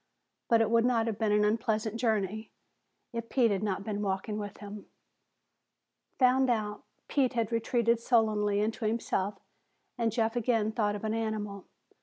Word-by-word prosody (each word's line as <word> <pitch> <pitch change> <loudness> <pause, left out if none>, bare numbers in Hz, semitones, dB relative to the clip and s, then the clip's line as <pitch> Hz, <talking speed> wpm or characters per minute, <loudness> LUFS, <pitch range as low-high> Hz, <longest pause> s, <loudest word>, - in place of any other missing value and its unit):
But 230 -1 +5
it 220 0 +1
would 230 0 +4
not 235 -2 +2
have 220 -3 -3
been 220 -2 +1
an 210 0 +4
unpleasant 220 0 0
journey 220 -2 -1 0.6
if 230 0 -5
Pete 240 -4 +3
had 195 -1 0
not 200 -2 -2
been 205 -1 -3
walking 200 +1 -2
with 205 -1 -6
him. 205 0 -9 1.3
Found 260 0 +4
out, 210 -3 -1 0.2
Pete 265 -3 +1
had 230 -2 -1
retreated 230 0 +1
sullenly 215 -4 +2
into 220 +2 -2
himself 210 -3 -1 0.6
and 230 -1 +1
Jeff 225 0 0
again 225 -2 +1
thought 210 -2 0
of 205 - -7
an 220 0 -1
animal. 215 -3 -3
220 Hz, 160 wpm, -30 LUFS, 210-230 Hz, 1.3 s, But